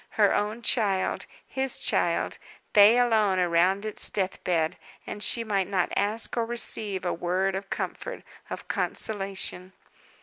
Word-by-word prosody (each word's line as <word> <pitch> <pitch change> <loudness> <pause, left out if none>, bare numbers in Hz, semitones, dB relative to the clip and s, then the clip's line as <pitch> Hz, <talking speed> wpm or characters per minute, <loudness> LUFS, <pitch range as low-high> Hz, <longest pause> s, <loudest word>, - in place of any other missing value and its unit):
Her - - +5
own 215 +3 -1
child 200 -5 0 0.2
his 265 0 -2
child - - 0 0.3
they 210 +2 +7
alone 220 -6 +3
around 180 +3 +2
its 215 - -3
death 190 -2 -2
bed, 165 -1 0 0.3
and 205 - -7
she 230 +2 +1
might 200 -4 0
not 185 -3 0
ask 210 +3 0
or 235 - +1
receive 220 -4 +2
a 175 - 0
word 185 +3 0
of 195 +1 -5
comfort, - - -5 0.3
of - - -7
consolation! 195 -3 -2
200 Hz, 140 wpm, -27 LUFS, 185-220 Hz, 0.3 s, they